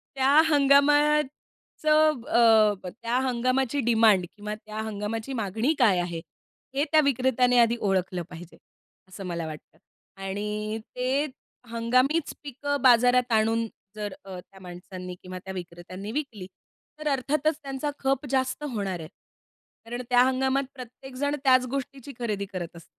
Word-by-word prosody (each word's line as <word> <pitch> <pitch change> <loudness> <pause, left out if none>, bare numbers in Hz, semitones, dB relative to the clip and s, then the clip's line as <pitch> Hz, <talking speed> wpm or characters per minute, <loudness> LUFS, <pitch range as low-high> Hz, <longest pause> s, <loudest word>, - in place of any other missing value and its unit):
त्या 270 +1 +3 0.2
हंगामाचं 295 0 +2
अ, 215 -5 +4
त्या 230 +5 -3
हंगामाची 255 +2 0
डिमांड 220 -5 +5
किंवा 210 0 -5
त्या 215 0 -10
हंगामाची 220 +3 -4
मागणी 225 +5 0
काय 205 -8 +4
आहे? 175 -1 -3 0.6
हे 280 - +2
त्या 310 -1 +6
विक्रेत्याने 255 -2 +2
आधी 235 0 +4
ओळखलं 185 -3 0
पाहिजे, 175 0 -11 0.5
असं 190 +1 -9
मला 170 -2 -3
वाटतं 155 -1 -10 0.5
आणि 210 +2 -3 0.2
ते 260 +3 0 0.5
हंगामीच 255 +7 +1
पिकं 285 +1 -3
बाजारात 250 -1 +5
आणून, 225 +1 +2 0.3
जर 210 -2 -4
अ, 190 -2 -7
त्या 190 +2 -16
माणसांनी 180 0 -8
किंवा 185 0 -7
त्या 190 - -6
विक्रेत्यांनी 180 +3 -8
विकली 235 -9 -4 0.5
तर 305 - -4
अर्थातच 290 +3 0
त्यांचा 275 +1 -3
खप 270 +1 0
जास्त 260 +2 0
होणार 195 -5 -3
आहे. 155 - -7 0.8
कारण 240 +2 -5
त्या 245 0 +5
हंगामात 265 +1 +1
प्रत्येकजण 265 +3 -5
त्याच 255 -1 +5
गोष्टीची 275 +1 -5
खरेदी 210 -4 -2
करत 180 -3 -7
असतो. 170 - -12
235 Hz, 135 wpm, -26 LUFS, 200-270 Hz, 0.8 s, त्या